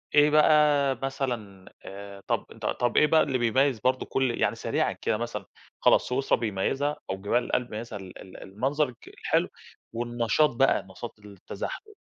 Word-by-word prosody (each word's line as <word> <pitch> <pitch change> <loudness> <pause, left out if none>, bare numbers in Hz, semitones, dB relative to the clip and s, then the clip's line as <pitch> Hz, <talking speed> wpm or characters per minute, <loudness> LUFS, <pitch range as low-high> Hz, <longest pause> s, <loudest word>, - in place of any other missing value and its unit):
إيه 150 0 +6
بقى 150 -2 +4
مثلًا 120 -9 -4 0.2
آآ 100 0 -9
طَب - - 0
ط - - -11
طَب 120 -1 0
إيه 150 - +6
بقى 160 +1 +5
اللي 130 -2 -1
بيميز 125 +1 +2
برضو 130 +3 0
كل 130 -3 -1
يعني - - +2
سريعًا - - 0
كده 110 - -1
مثلًا، 120 +1 -5 0.4
خلاص - - +4
سويسرا 130 +2 +1
بيميزها 125 +7 -1
أو 95 - -2
جبال 120 +5 +1
الألب 125 -1 -1
بيميزها 110 -1 -6
ال 95 -1 -11
ال 95 - -12
المنظر 135 +9 -1
الك 120 - -16
الحلو، - - 0 0.5
والنشاط 120 +4 +1
بقى، 135 -5 +3
نشاط 105 +4 -9
التزحلق. 105 - -8
120 Hz, 165 wpm, -27 LUFS, 105-140 Hz, 0.5 s, إيه